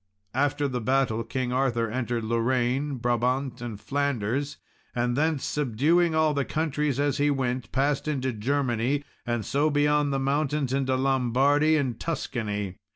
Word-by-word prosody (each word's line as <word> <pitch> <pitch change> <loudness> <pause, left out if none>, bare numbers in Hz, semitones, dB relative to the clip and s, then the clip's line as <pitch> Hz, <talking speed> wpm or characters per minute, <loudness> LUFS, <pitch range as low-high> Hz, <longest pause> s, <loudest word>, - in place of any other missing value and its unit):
After 145 +2 +1
the 125 -2 -3
battle, 125 -2 +1
King 125 +2 -2
Arthur 120 -3 +1
entered 120 0 -2
Lorraine, 125 +5 0
Brabant, 125 +1 0
and 115 -4 -5
Flanders, 140 +1 -1 0.4
and 120 0 0
thence, 155 0 +1
subduing 150 +6 +2
all 155 -1 +3
the 140 -1 0
countries 150 -2 -1
as 145 0 +1
he 145 +1 +3
went, 130 -4 -1
passed 140 +2 0
into 130 -4 -1
Germany, 130 +3 0 0.2
and 120 -2 -1
so 145 +3 +1
beyond 145 0 +2
the 135 - 0
mountains 140 0 0
into 135 -1 +1
Lombardy 135 +4 +3
and 130 -6 -1
Tuscany. 105 - -3
135 Hz, 145 wpm, -26 LUFS, 120-145 Hz, 0.4 s, all